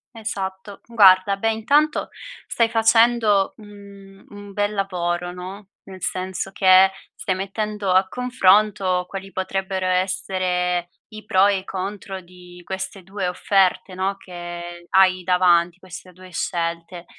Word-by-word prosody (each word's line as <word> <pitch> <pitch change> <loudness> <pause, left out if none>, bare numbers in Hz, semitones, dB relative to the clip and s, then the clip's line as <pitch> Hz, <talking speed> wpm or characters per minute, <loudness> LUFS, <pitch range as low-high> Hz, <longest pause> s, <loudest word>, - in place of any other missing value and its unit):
Esatto. 200 -2 -6
Guarda, 195 -3 +5
beh, 225 +2 +1
intanto 290 +8 +1 0.4
stai 230 -1 +1
facendo, 225 -3 +3
mhmm, 200 -2 -15
un 205 0 -11
bel 205 +1 -1
lavoro, 175 -3 -2
no, 190 +3 -9
nel 190 -2 -12
senso 185 +1 -3
che 190 0 +5 0.2
stai 190 - -2
mettendo 200 0 -3
a 190 +1 +4
confronto 200 -6 +2
quali 195 0 -8
potrebbero 190 0 -3
essere 180 -1 -1 0.2
i 215 - -9
pro 190 +1 +4
e 200 -2 +1
i - - -12
contro 195 0 -6
di 180 0 -15
queste 190 0 -6
2 190 0 -4
offerte, 190 0 +1
no, 195 +1 -2
che 175 -1 -9
hai 185 -1 +4
davanti 180 -1 +3
queste 185 0 -11
2 185 +1 -15
scelte, 170 +1 -4
190 Hz, 130 wpm, -22 LUFS, 180-200 Hz, 0.4 s, Guarda